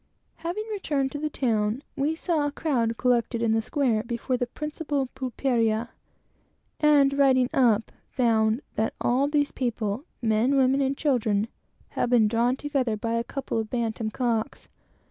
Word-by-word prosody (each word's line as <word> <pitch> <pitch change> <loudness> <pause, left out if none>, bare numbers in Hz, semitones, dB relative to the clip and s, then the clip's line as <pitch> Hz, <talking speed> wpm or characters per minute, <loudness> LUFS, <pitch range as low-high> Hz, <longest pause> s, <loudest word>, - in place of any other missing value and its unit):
Having 345 +6 -3
returned 290 -10 -1
to 290 - -5
the 305 +1 -2
town, 225 -2 0
we 290 +3 0
saw 335 -1 -1
a - - +1
great - - -33
crowd 235 -7 0
collected 235 -2 +1
in 230 - +2
the 225 0 +2
square 240 -3 0
before 235 +2 -2
the 245 -1 -1
principal 290 -1 -3
pulperia, 235 -3 0 0.9
and 290 -2 +5
riding 260 -3 +3
up, 230 -4 +3 0.2
found 225 0 +2
that 220 - -1
all 260 +4 +2
these 290 -1 +1
people 235 -2 -2 0.2
men, 230 +4 +2
women, 265 +1 +3
and 270 0 0
children 225 -7 +1 0.4
had - - -1
been 235 -3 +5
drawn 235 +3 +2
together 265 -6 -1
by 230 +2 -2
a 230 0 0
couple 265 -2 -3
of 220 -1 -4
bantam 225 -2 -2
cocks. 235 +2 -2
250 Hz, 160 wpm, -26 LUFS, 225-280 Hz, 0.9 s, and